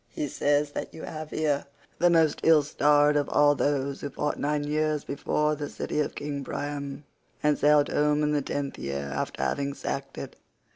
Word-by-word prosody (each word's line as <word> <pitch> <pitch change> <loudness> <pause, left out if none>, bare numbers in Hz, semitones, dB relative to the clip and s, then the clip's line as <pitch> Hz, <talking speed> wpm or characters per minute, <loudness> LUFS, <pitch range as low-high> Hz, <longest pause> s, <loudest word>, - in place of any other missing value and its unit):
He 150 - -3
says 145 +1 +1
that - - -5
you 160 - -9
have 155 -1 -6
here 145 -3 0 0.3
the 175 - +5
most 160 -3 +3
ill 160 -2 +5
starred 145 0 +3
of 145 -1 +1
all 145 0 +5
those 140 -1 -1
who 145 - -3
fought 150 +2 -2
nine 145 0 0
years 150 0 0
before 150 +2 0
the 150 -1 -4
city - - -3
of 150 - -1
King 145 -1 -4
Priam 140 0 -5 0.4
and 150 0 +4
sailed 145 0 +4
home 150 0 +2
in 150 - +1
the 145 -1 +1
tenth 140 0 -4
year 70 0 -4
after 70 - -3
having 140 0 -1
sacked 135 -1 -5
it. - - -7
145 Hz, 190 wpm, -27 LUFS, 140-150 Hz, 0.4 s, the